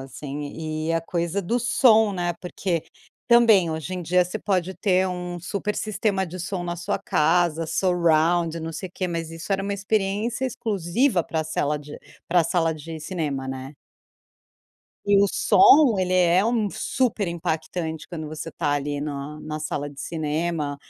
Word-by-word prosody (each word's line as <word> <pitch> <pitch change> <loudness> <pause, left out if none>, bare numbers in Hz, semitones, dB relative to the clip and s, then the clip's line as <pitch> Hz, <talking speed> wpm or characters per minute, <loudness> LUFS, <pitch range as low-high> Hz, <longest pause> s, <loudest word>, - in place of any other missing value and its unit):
assim. 140 +2 -7 0.5
E - - +1
a 165 - +1
coisa 170 +3 -2
do 230 +7 0
som, 230 -3 +4
né, 175 -2 -1
porque 180 -2 -3 0.4
também 225 -8 +5
hoje 160 +3 -4
em 180 - -4
dia 180 +2 +3
você 180 +5 -5
pode 190 -3 -1
ter 185 +1 +2
um 180 -1 -5
super 205 +3 -3
sistema 205 -2 -1
de 180 +2 -8
som 180 +1 -3
na 175 0 -3
sua 175 - -2
casa, 165 +1 +1
surround, 170 -1 +2
não 165 0 -5
sei 185 -3 -6
quê. 185 0 -3
Mas 165 -1 -3
isso 165 +4 -9
era 195 0 0
uma 200 - -2
experiência 205 +4 -1
exclusiva 220 - 0
pra 160 - -2
a - - -3
sala 150 -1 -1
de 145 0 -10 0.3
para 175 0 +4
a - - +1
sala 165 -1 +1
de 160 +1 -8
cinema, 150 -5 -3
né. 130 +2 -6 1.3
E 205 - +5
o - - +5
som, 305 - +6
ele 185 0 0
é 180 +1 +4
um 225 -2 +1
super 225 -1 -1
impactante 160 -1 -3
quando 160 -3 -6
você 155 +1 -6
está 145 -1 -1
ali 145 0 -2
na 145 +1 -5
na 155 0 -5
sala 150 -1 -3
de 140 -1 -14
cinema, 155 -1 -2
175 Hz, 170 wpm, -24 LUFS, 155-195 Hz, 1.3 s, som